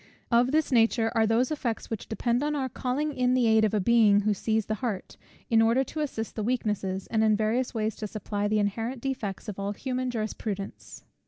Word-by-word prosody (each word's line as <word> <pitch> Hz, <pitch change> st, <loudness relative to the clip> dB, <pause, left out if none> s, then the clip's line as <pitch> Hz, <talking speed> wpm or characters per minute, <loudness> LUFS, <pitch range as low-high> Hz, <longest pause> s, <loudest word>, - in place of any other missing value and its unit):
Of 240 Hz, +2 st, +4 dB
this 310 Hz, -1 st, +1 dB
nature 230 Hz, -1 st, +3 dB
are 225 Hz, -2 st, +3 dB
those 235 Hz, +6 st, +2 dB
effects, 245 Hz, -8 st, -3 dB
which 225 Hz, -, -4 dB
depend 235 Hz, +2 st, 0 dB
on 300 Hz, +1 st, 0 dB
our 270 Hz, -2 st, -1 dB
calling 280 Hz, +5 st, -2 dB
in 250 Hz, -1 st, +2 dB
the 250 Hz, -2 st, +3 dB
aid 220 Hz, -1 st, +4 dB
of 215 Hz, 0 st, +2 dB
a -, -, +2 dB
Being 210 Hz, -1 st, +5 dB
who 210 Hz, +1 st, +1 dB
sees 220 Hz, +2 st, 0 dB
the 215 Hz, -, -2 dB
heart, 220 Hz, -7 st, -3 dB, 0.3 s
in 225 Hz, -1 st, +4 dB
order 230 Hz, +4 st, +3 dB
to 310 Hz, -, -7 dB
assist 245 Hz, -7 st, -3 dB
the 220 Hz, -, -2 dB
weakness, 220 Hz, -3 st, -1 dB, 0.2 s
and 220 Hz, -1 st, +1 dB
in 215 Hz, -1 st, +4 dB
various 225 Hz, +4 st, 0 dB
ways 220 Hz, 0 st, -1 dB
to 215 Hz, -, -4 dB
supply 205 Hz, 0 st, -3 dB
the 215 Hz, +1 st, +1 dB
inherent 225 Hz, +5 st, -1 dB
defects 230 Hz, -6 st, -4 dB
of 205 Hz, -2 st, -6 dB
all 200 Hz, +1 st, -2 dB
human 255 Hz, +2 st, -3 dB
jurisprudence. 215 Hz, -3 st, -5 dB
225 Hz, 215 wpm, -27 LUFS, 215-250 Hz, 0.3 s, Being